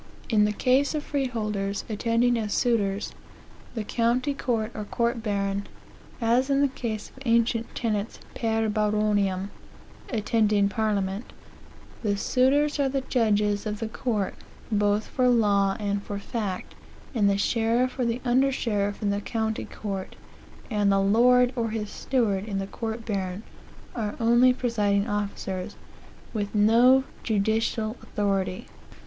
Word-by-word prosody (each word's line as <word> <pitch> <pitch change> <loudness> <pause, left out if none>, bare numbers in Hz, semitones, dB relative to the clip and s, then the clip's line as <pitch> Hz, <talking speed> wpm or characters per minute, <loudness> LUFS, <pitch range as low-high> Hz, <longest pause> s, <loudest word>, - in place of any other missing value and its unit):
"In 210 -3 +4
the 210 - +1
case 265 +7 +2
of 300 - -2
freeholders 215 -9 -2
attending 230 +2 +1
as 215 -3 -2
suitors, 205 -5 0 0.6
the 220 - -2
county 240 +6 +1
court 235 -5 -1
or 215 - -5
court 235 +2 -1
baron., 200 -2 -1 0.5
(as 245 +3 +2
in 275 0 +3
the 285 - +4
case 230 -5 -5
of - - -24
the 265 -1 -9
ancient 230 0 +1
tenants 215 -2 -2 0.2
per 225 -1 0
baroniam 210 -2 +1 0.6
attending 210 -3 +2
Parliament,) 205 0 -1 0.7
the 205 -3 0
suitors 285 +7 +2
are 275 -1 +2
the 270 0 -1
judges 210 -3 +1
of 210 0 -3
the 225 - -2
court, 220 -3 -2 0.4
both 210 0 +2
for 255 -1 +1
law 200 -4 +3
and 200 -1 -1
for 205 0 -5
fact, 200 -3 -4 0.4
and 210 -5 +3
the 200 - +2
sheriff 235 +5 +1
or - - +2
the 235 +2 -1
under 260 +3 +3
sheriff 205 -5 -1
in 200 - +1
the 200 0 -1
county 220 0 -2
court, 195 -3 -6 0.6
and 205 -2 +2
the 195 - +3
lord 245 +5 +4
or 230 -2 -1
his 215 -1 -4
steward 210 -7 0
in 205 -3 -3
the 195 - -2
court 225 +3 -5
baron, 195 -2 -3 0.5
are 215 -4 -3
only 240 +2 +5
presiding 210 -5 0
officers, 200 -3 -3 0.6
with 205 -1 -3
no 235 +5 +5 0.2
judicial 220 +1 0
authority." 195 -2 -1
220 Hz, 140 wpm, -26 LUFS, 205-240 Hz, 0.7 s, only